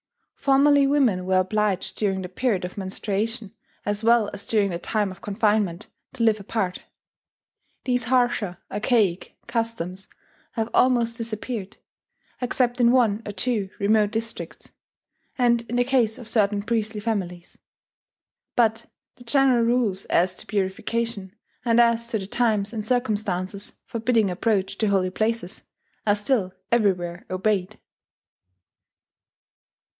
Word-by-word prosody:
Formerly 280 Hz, 0 st, +4 dB
women 245 Hz, -11 st, +2 dB
were 190 Hz, 0 st, +3 dB
obliged 195 Hz, +1 st, 0 dB
during 195 Hz, -3 st, 0 dB
the -, -, -4 dB
period 190 Hz, 0 st, -1 dB
of 180 Hz, -, -7 dB
menstruation, 205 Hz, +2 st, -3 dB, 0.3 s
as 205 Hz, +1 st, -2 dB
well 230 Hz, -2 st, +4 dB
as 200 Hz, -, -6 dB
during 205 Hz, -3 st, +2 dB
the 170 Hz, -, -3 dB
time 210 Hz, 0 st, -1 dB
of 185 Hz, -, -12 dB
confinement, 205 Hz, -4 st, 0 dB, 0.3 s
to 250 Hz, -3 st, -2 dB
live 220 Hz, -2 st, +3 dB
apart. 195 Hz, -2 st, -2 dB, 1.1 s
These 245 Hz, -2 st, +1 dB
harsher 240 Hz, -7 st, +1 dB
archaic 205 Hz, -4 st, 0 dB
customs 225 Hz, -5 st, -3 dB, 0.5 s
have 225 Hz, -1 st, -2 dB
almost 235 Hz, -2 st, +3 dB
disappeared, 220 Hz, -2 st, -5 dB, 0.6 s
except 250 Hz, 0 st, 0 dB
in 235 Hz, 0 st, +6 dB
one 230 Hz, -4 st, +3 dB
or -, -, -3 dB
two 210 Hz, -2 st, -1 dB
remote 210 Hz, +1 st, +3 dB
districts, 225 Hz, +1 st, -5 dB, 0.7 s
and 240 Hz, -2 st, +3 dB
in 240 Hz, -, -2 dB
the 245 Hz, -, +4 dB
case 245 Hz, -4 st, +1 dB
of 240 Hz, -, -10 dB
certain 205 Hz, -2 st, +1 dB
priestly 220 Hz, -1 st, -1 dB
families; 190 Hz, -5 st, -4 dB, 1.0 s
but 225 Hz, -1 st, +2 dB, 0.3 s
the 245 Hz, -, -14 dB
general 260 Hz, -1 st, +4 dB
rules 230 Hz, -5 st, +1 dB
as 180 Hz, +1 st, +2 dB
to -, -, -8 dB
purification, 200 Hz, +1 st, -2 dB, 0.3 s
and 235 Hz, -1 st, +3 dB
as 235 Hz, 0 st, +3 dB
to 235 Hz, -, -1 dB
the 195 Hz, -, -5 dB
times 215 Hz, -1 st, 0 dB
and 215 Hz, -2 st, -4 dB
circumstances 205 Hz, -5 st, -1 dB
forbidding 225 Hz, -3 st, +1 dB
approach 195 Hz, +1 st, 0 dB
to 220 Hz, -, +2 dB
holy 190 Hz, -2 st, +1 dB
places, 215 Hz, -2 st, -2 dB, 0.5 s
are 205 Hz, -, +5 dB
still 210 Hz, -3 st, 0 dB, 0.2 s
everywhere 180 Hz, -6 st, +1 dB
obeyed. 195 Hz, +2 st, -1 dB
215 Hz, 130 wpm, -24 LUFS, 195-235 Hz, 1.1 s, in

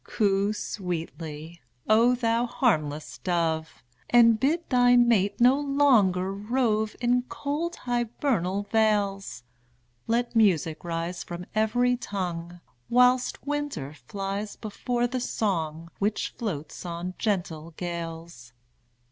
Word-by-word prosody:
Coo 200 Hz, -1 st, +1 dB
sweetly, 165 Hz, -5 st, -5 dB, 0.3 s
O 230 Hz, +3 st, +5 dB
thou 235 Hz, 0 st, +1 dB
harmless 155 Hz, -, -1 dB
dove, 160 Hz, -8 st, -1 dB, 0.3 s
And 230 Hz, -2 st, +6 dB
bid 325 Hz, +7 st, +1 dB
thy 245 Hz, -1 st, +5 dB
mate 230 Hz, -5 st, +3 dB
no 250 Hz, +3 st, +5 dB
longer 235 Hz, -11 st, +3 dB
rove 220 Hz, 0 st, 0 dB
In 245 Hz, +1 st, +2 dB
cold 310 Hz, +5 st, -3 dB
hybernal 235 Hz, -5 st, -1 dB
vales! 200 Hz, -, +1 dB, 0.6 s
Let 235 Hz, +1 st, 0 dB
music 165 Hz, -8 st, +2 dB
rise 170 Hz, +1 st, -3 dB
from 175 Hz, +1 st, -7 dB
every 245 Hz, +3 st, +2 dB
tongue, 175 Hz, -5 st, -5 dB, 0.3 s
Whilst 250 Hz, +2 st, +3 dB
winter 290 Hz, -, -3 dB
flies 195 Hz, +9 st, -5 dB
before 240 Hz, +3 st, -2 dB
the 255 Hz, +1 st, -2 dB
song 170 Hz, -9 st, -2 dB
Which 205 Hz, +2 st, 0 dB
floats 160 Hz, -10 st, -5 dB
on 175 Hz, +1 st, -5 dB
gentle 170 Hz, -6 st, -2 dB
gales. 165 Hz, -6 st, -6 dB
205 Hz, 105 wpm, -26 LUFS, 170-240 Hz, 0.6 s, And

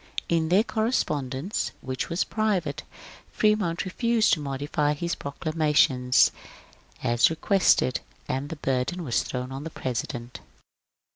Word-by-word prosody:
In 165 Hz, -1 st, +1 dB
their 190 Hz, +5 st, +5 dB
cor 220 Hz, -2 st, -1 dB
respondence, 145 Hz, -, -1 dB
which 130 Hz, 0 st, -4 dB
was 170 Hz, +2 st, +1 dB
private, 200 Hz, -9 st, -1 dB, 0.5 s
Fremont 210 Hz, -6 st, +1 dB
refused 230 Hz, +3 st, +2 dB
to 160 Hz, -, +2 dB
modify 145 Hz, +1 st, -1 dB
his 170 Hz, +3 st, -2 dB
proclamation, 150 Hz, -4 st, +1 dB, 0.9 s
as 120 Hz, 0 st, +4 dB
requested, 165 Hz, -5 st, +2 dB, 0.3 s
and 135 Hz, +2 st, -2 dB
the 165 Hz, -, -4 dB
burden 135 Hz, +5 st, -1 dB
was 120 Hz, -7 st, +1 dB
thrown 125 Hz, 0 st, -5 dB
on 135 Hz, +2 st, -5 dB
the 160 Hz, -, -5 dB
President. 120 Hz, -3 st, -4 dB
155 Hz, 125 wpm, -26 LUFS, 130-180 Hz, 0.9 s, their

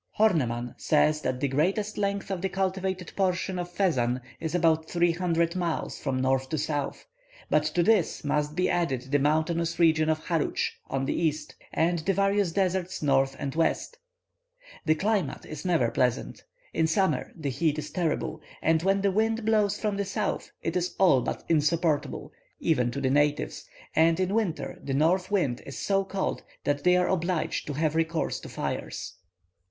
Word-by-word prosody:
Horneman 125 Hz, -, +2 dB
says 155 Hz, 0 st, +3 dB
that 125 Hz, -, -2 dB
the 140 Hz, -, +1 dB
greatest 190 Hz, +10 st, 0 dB
length 200 Hz, -1 st, -2 dB
of 185 Hz, -2 st, -2 dB
the 195 Hz, -, 0 dB
cultivated 190 Hz, -1 st, -2 dB
portion 185 Hz, -1 st, 0 dB
of 175 Hz, 0 st, -4 dB
Fezzan 130 Hz, -11 st, +1 dB, 0.2 s
is 160 Hz, +1 st, -3 dB
about 160 Hz, -2 st, +2 dB
three 175 Hz, 0 st, +3 dB
hundred 170 Hz, 0 st, 0 dB
miles 175 Hz, -3 st, -2 dB
from 135 Hz, -2 st, -1 dB
north 130 Hz, 0 st, +1 dB
to 155 Hz, -, -1 dB
south, 145 Hz, -1 st, -2 dB, 0.5 s
but 150 Hz, 0 st, +3 dB
to 170 Hz, +3 st, +1 dB
this 205 Hz, -3 st, +2 dB
must 150 Hz, +1 st, 0 dB
be 180 Hz, 0 st, +2 dB
added 135 Hz, -7 st, -1 dB
the 145 Hz, -, +4 dB
mountainous 160 Hz, +3 st, +1 dB
region 160 Hz, -2 st, +4 dB
of 155 Hz, 0 st, -1 dB
Harutsch 165 Hz, -4 st, 0 dB, 0.2 s
on 135 Hz, 0 st, -1 dB
the -, -, 0 dB
east, 155 Hz, -2 st, -1 dB, 0.2 s
and 170 Hz, +1 st, +1 dB
the 190 Hz, +5 st, 0 dB
various 200 Hz, -2 st, +2 dB
deserts 185 Hz, -1 st, -1 dB
north 135 Hz, -1 st, +2 dB
and 140 Hz, -2 st, -4 dB
west. 165 Hz, -, 0 dB, 0.9 s
The 155 Hz, -, +4 dB
climate 190 Hz, -4 st, -1 dB
is 155 Hz, -, -8 dB
never 165 Hz, -10 st, +2 dB
pleasant; 125 Hz, 0 st, -1 dB, 0.3 s
in 160 Hz, -, +2 dB
summer 190 Hz, +4 st, +1 dB
the 150 Hz, -5 st, -3 dB
heat 150 Hz, +3 st, 0 dB
is 155 Hz, -, -5 dB
terrible, 160 Hz, -2 st, -1 dB, 0.2 s
and 160 Hz, 0 st, +2 dB
when 195 Hz, +2 st, +2 dB
the 200 Hz, 0 st, +2 dB
wind 220 Hz, +2 st, +1 dB
blows 210 Hz, -2 st, +2 dB
from 210 Hz, -2 st, -1 dB
the 200 Hz, -, -1 dB
south, 195 Hz, -, -2 dB
it -, -, -2 dB
is 180 Hz, 0 st, -1 dB
all 175 Hz, -9 st, +5 dB
but -, -, -4 dB
insupportable, 160 Hz, 0 st, +1 dB, 0.3 s
even 125 Hz, -7 st, +2 dB
to 140 Hz, +3 st, -4 dB
the 130 Hz, -1 st, +1 dB
natives, 145 Hz, -, +1 dB, 0.3 s
and 165 Hz, +2 st, +4 dB
in 185 Hz, +1 st, 0 dB
winter 210 Hz, -7 st, -1 dB
the 135 Hz, -, -2 dB
north 180 Hz, +6 st, +2 dB
wind 170 Hz, -12 st, 0 dB
is 140 Hz, -, -8 dB
so 195 Hz, -1 st, +1 dB
cold 195 Hz, 0 st, -2 dB, 0.2 s
that 145 Hz, 0 st, 0 dB
they 180 Hz, 0 st, +5 dB
are 180 Hz, 0 st, +2 dB
obliged 175 Hz, -2 st, -1 dB
to 145 Hz, -, -3 dB
have 155 Hz, +1 st, 0 dB
recourse 165 Hz, 0 st, 0 dB
to -, -, -10 dB
fires. -, -, -4 dB
165 Hz, 180 wpm, -27 LUFS, 150-185 Hz, 0.9 s, all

